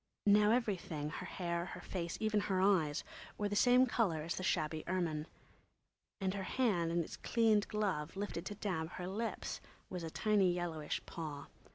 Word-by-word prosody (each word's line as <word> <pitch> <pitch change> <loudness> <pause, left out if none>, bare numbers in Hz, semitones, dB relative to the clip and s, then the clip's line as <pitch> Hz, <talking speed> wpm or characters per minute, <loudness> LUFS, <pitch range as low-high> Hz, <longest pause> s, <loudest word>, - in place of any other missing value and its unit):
Now 210 +1 +6
everything, 185 -10 0
her - - -5
hair, 170 -2 -2
her 180 - -7
face, 170 -3 -3
even 215 -1 +2
her 195 -2 0
eyes, 180 -7 +3 0.3
was 205 -1 -1
the - - 0
same 250 +4 +6
colour 195 -11 +1
as 165 - -2
the - - -4
shabby 155 -3 0
ermine, 170 -4 -1 0.9
and 190 -2 0
her 200 - -3
hand, 190 -6 +1
in 170 0 +2
its - - -8
cleaned 220 -3 +3
glove, 190 -6 -1
lifted 200 -4 -3
to 205 - -5
dab 175 -5 -2
her 180 - -5
lips, 220 +4 -3 0.3
was 180 -2 -3
a 165 - -4
tiny 200 +1 +3
yellowish 170 -4 -3
paw. 150 -4 -6
185 Hz, 175 wpm, -36 LUFS, 165-210 Hz, 0.9 s, Now